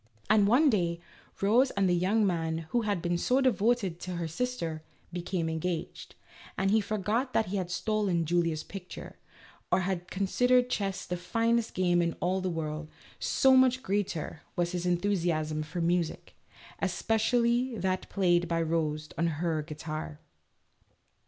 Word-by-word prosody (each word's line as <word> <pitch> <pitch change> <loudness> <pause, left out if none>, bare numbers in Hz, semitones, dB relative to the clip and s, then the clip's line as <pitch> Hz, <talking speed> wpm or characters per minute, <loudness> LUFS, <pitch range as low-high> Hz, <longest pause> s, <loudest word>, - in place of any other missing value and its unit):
And 210 -2 +5
one 260 +9 +5
day, 170 -5 0 0.4
Rose 235 +7 +4
and 200 -4 +1
the 180 - +3
young 195 +5 +2
man, 165 -3 -1
who 240 - +2
had 205 -5 -1
been 175 0 0
so 255 +7 +2
devoted 230 -7 +1
to 180 0 -5
her 170 -1 -2
sister, 165 -4 -3 0.3
became 175 -1 -2
engaged, 160 +1 -4 0.4
and 195 +1 +1
he 220 +1 +4
forgot 215 +5 -1
that 220 -3 +1
he 200 - -1
had 185 -2 -3
stolen 185 -2 0
Julia's 165 -1 0
picture, 190 -2 -9 0.5
or - - +3
had 180 -1 -3
considered 245 +6 +2
chess 195 -2 -2
the 180 - -3
finest 230 +6 0
game 175 -1 +3
in 170 -1 0
all 185 +2 0
the 185 - -1
world, 155 -2 -4 0.3
so 265 -1 +4
much 260 0 +4
greater 190 - -2
was 175 -1 0
his 180 -1 -2
enthusiasm 170 -4 0
for 155 +3 -4
music 170 -1 -1 0.5
(espe - - -2
cially 240 +1 +1
that 185 +1 -1
played 175 -3 +2
by 165 0 0
Rose 155 -2 -1
on 170 - +2
her 160 0 -1
guitar). 155 0 -6
180 Hz, 155 wpm, -29 LUFS, 165-215 Hz, 0.5 s, And